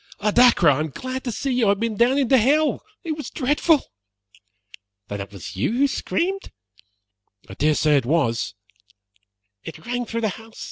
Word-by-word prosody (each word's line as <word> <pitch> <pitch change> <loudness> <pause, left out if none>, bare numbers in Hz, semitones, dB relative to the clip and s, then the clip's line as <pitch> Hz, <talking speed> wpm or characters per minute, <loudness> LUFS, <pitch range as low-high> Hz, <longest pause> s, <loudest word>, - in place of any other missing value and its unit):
"Oh, 210 +1 +1
Dacre, 240 -7 +5
I 145 -1 +4
am 155 0 -2
glad 255 - -6
to 245 - -2
see 270 +5 -3
you! 245 -2 +2
I - - +3
have 200 0 +2
been 230 -1 -1
down 240 +5 +3
into 270 -2 +3
hell. 290 +6 +2 0.2
It 330 - -4
was 300 -5 -7
dreadful." 295 +3 +2 1.3
"Then 100 -1 -4
it 100 - -8
was 100 -3 -9
you 100 - 0
who 275 +4 +3
screamed?" 375 +7 -2 1.0
"I - - -10
dare 150 +8 +1
say 150 -1 +3
it 135 - 0
was." 120 -7 0 1.1
"It 165 - -10
rang 245 0 -3
through 230 0 -3
the 220 - +1
house. 225 +4 -11
230 Hz, 185 wpm, -22 LUFS, -, 1.3 s, Dacre